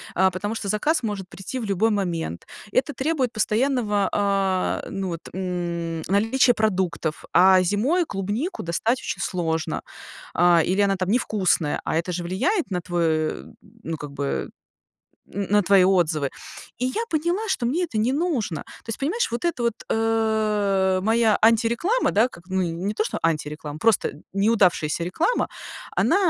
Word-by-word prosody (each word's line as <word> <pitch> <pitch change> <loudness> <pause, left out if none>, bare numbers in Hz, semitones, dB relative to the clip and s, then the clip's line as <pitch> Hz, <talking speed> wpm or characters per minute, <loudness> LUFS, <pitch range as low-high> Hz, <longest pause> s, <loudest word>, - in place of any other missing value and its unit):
a 190 +1 +4
потому 205 +4 -3
что 215 - -4
заказ 295 +9 +1
может 205 -4 -3
прийти 195 +9 -6
в 230 - -4
любой 200 +2 +2
момент, 175 - -2 0.3
это 265 +3 +1
требует 270 -4 -1
постоянного, 215 -2 +1
а, 195 -2 0
ну, 195 -1 -3
вот, 170 -1 -4 0.2
м, 170 -3 -3
наличия 225 +6 +3
продуктов. 185 -8 -1
А 185 +1 +6
зимой 235 - +1
клубнику 215 - -3
достать 220 +9 0
очень - - -4
сложно, 165 -3 -2 0.5
а, 175 -1 +5
или 190 +2 0
она 195 -1 +2
там 185 0 -2
невкусная, 195 -8 +1
а, - - -2
это 170 +2 -2
же 175 0 -3
влияет 255 - 0
на 180 - 0
твой 175 0 -2
э, 155 - 0 0.4
ну, 160 0 -4
как 145 -1 -8
бы, 140 0 -2 0.9
н 200 +1 -2
на 205 0 +4
твои 190 0 +5
отзывы. 160 -7 +2 0.5
И 250 - 0
я 260 - -1
поняла, 345 +7 0
что 265 -11 0
мне 325 +9 +1
это 270 -11 -3
не 230 +5 +2
нужно. 275 - -1 0.2
То - - -24
есть 225 - -4
понимаешь, 355 - 0
вот 235 +5 -4
это 335 -8 0
вот, 235 -2 +1 0.2
э, 215 -4 +1
моя 225 +1 +3
антиреклама, 235 - +3
да, 220 +5 +4
как 170 - -15
ну, 190 0 0
не 175 +4 -2
то, 215 - 0
что - - -3
антиреклама, 150 -2 -2
просто 225 +3 +3
н 145 - -15
неудавшаяся 190 -6 +2
реклама. 320 - 0 0.5
Она - - +3
200 Hz, 165 wpm, -24 LUFS, 175-235 Hz, 0.9 s, А